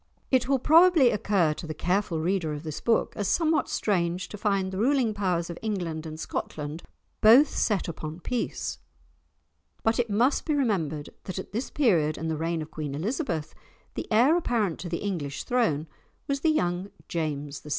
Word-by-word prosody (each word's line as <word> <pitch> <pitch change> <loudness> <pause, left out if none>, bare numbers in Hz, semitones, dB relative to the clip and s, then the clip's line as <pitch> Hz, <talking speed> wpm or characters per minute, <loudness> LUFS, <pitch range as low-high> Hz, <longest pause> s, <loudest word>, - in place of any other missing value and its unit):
It 255 -1 +2
will 275 - +4
probably 320 0 +6
occur 195 -6 +2
to 165 - -8
the 155 - -5
careful 180 0 0
reader 170 -2 0
of 150 +1 -6
this 155 -2 -5
book 230 -1 +1
as 205 - -2
somewhat 320 - +2
strange 180 -3 0
to - - -7
find 195 -3 0
the 190 - -4
ruling 250 -1 +2
powers 180 -4 0
of 170 - -8
England 175 -7 -3
and 155 0 -8
Scotland 150 0 -4 0.4
both 245 +7 +7
so - - -9 0.2
set 190 - -4
upon 160 0 -6
peace; 245 +6 -3 1.0
but 225 +2 +2
it 240 -1 +1
must 235 +7 +2
be 305 - 0
remembered 165 - -1
that 185 - -5
at 190 - -6
this 230 +5 -3
period 170 - +2
in 160 - -3
the 160 - 0
reign 165 +1 -2
of 155 - -12
Queen 150 -3 -4
Elizabeth 175 - -2 0.4
the - - -6
heir 245 +9 +5
apparent 230 - 0
to 175 - -5
the 170 +2 -3
English 160 -9 -3
throne 220 -12 +1 0.4
was 280 0 0
the 320 - +2
young 180 - 0 0.2
James 150 -4 -3
VI. 150 - -12
190 Hz, 185 wpm, -27 LUFS, 160-235 Hz, 1.0 s, both